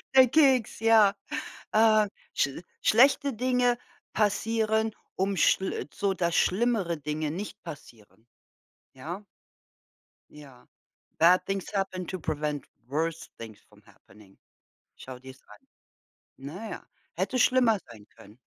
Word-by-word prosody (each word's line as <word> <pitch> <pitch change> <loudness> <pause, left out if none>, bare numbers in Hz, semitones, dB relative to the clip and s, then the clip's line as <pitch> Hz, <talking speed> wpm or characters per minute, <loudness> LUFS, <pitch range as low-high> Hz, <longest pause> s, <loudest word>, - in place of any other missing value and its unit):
der 260 -1 +8
Keks, 265 -6 +3
ja, 220 -3 +5 0.6
äh. 215 -1 +5 0.3
schl 140 +5 -1 0.2
schlechte 275 +4 +4
Dinge 245 +1 +1 0.4
passieren, 220 +1 +1 0.2
um 195 +1 0
schl 175 -3 +1
so, 200 -1 0
dass 170 -2 -1
schlimmere 195 -5 +1
Dinge 150 +1 -3
nicht 200 +5 -7
passieren, 115 -5 -12 0.7
ja? 170 +10 -7 1.1
Ja. 140 -4 -15 0.5
Bad 180 +2 +5
things 195 -2 -3
happen 190 -2 -2
to 185 - -5
prevent 150 -2 -3 0.2
worst 160 +4 -3
things 110 -2 -10
from - - -21
happening. 100 -1 -20 0.6
Schau 130 -1 -10
dir's 130 0 -13
an. 105 - -17 0.7
Na 165 +12 -7
ja, - - -7 0.3
hätte 255 - -1
schlimmer 245 -4 +4
sein 105 -3 -14
können, 105 +4 -16
185 Hz, 115 wpm, -27 LUFS, 145-220 Hz, 1.1 s, der